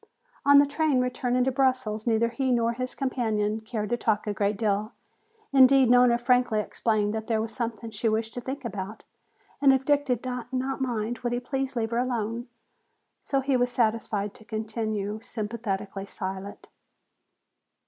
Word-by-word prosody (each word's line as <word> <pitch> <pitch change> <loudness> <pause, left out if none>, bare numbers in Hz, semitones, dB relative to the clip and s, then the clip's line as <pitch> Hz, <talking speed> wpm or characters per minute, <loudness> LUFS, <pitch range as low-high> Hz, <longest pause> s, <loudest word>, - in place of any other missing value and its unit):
On 285 0 +8
the 285 - +7
train 285 -1 +1
returning 250 0 0
to 265 - +1
Brussels 255 -5 0
neither 230 0 +3
he 260 +2 -1
nor 235 -1 +2
his 255 +1 -4
companion 220 -5 -1
cared 220 -1 -4
to 240 - +2
talk 215 -2 0
a 210 - -1
great 200 0 0
deal. 210 +1 0 0.6
Indeed, 265 -2 +6
Nona 245 -1 +6
frankly 245 -2 +2
explained 210 -1 0
that 220 0 -4
there 225 -2 +1
was 220 +1 -3
something 230 -2 -4
she 225 +1 0
wished 220 +1 -1
to 245 - -5
think 265 +2 -6
about, 205 -1 -5 0.6
and 275 -1 +7
if 265 0 +1
Dick 290 -1 +3
did 250 -3 -2
not 250 -1 -4 0.3
mind, 235 -2 -2
would 240 0 -2
he 245 - 0
please 270 +1 -3
leave 225 -1 -1
her 235 - +1
alone. 235 -1 -2 0.7
So 275 -1 -1
he 270 0 +1
was 245 0 +2
satisfied 215 -3 0
to - - -12
continue 215 -1 -3
sympathetically 210 -4 -4
silent. 190 +1 -6
235 Hz, 170 wpm, -27 LUFS, 215-250 Hz, 0.7 s, On